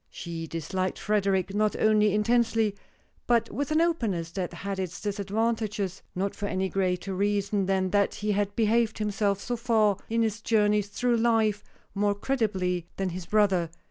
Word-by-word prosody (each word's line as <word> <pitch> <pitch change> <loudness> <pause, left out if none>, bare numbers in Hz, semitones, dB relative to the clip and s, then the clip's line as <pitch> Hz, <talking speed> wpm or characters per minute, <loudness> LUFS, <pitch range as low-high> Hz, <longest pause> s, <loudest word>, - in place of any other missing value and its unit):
She 165 -1 -6
disliked 185 +4 -3
Frederic, 195 -2 0
not 210 0 +1
only 215 -1 +4
intensely, 225 -1 +2 0.5
but 230 -1 +2
with 285 0 -2
an 310 +1 +3
openness 220 - 0
that 180 -1 -3
had 195 +3 -5
its 180 -3 -4
disadvantages 210 -1 -2
not 195 +2 -1
for 200 - -4
any 190 -1 -1
greater 185 0 -1
reason 200 0 0
than 190 -1 +1
that 200 0 +2
he 210 0 -1
had 205 0 0
behaved 225 0 +2
himself 205 -2 0
so 245 +4 -3
far 220 -4 +2
in 230 +1 +2
his 220 -1 -2
journey 210 -2 +3
through 235 +4 0
life 220 -3 +2 0.3
more 205 0 +1
creditably 190 -8 -1
than 195 -1 -1
his 175 0 -6
brother. 195 -6 +2
205 Hz, 160 wpm, -27 LUFS, 190-220 Hz, 0.5 s, only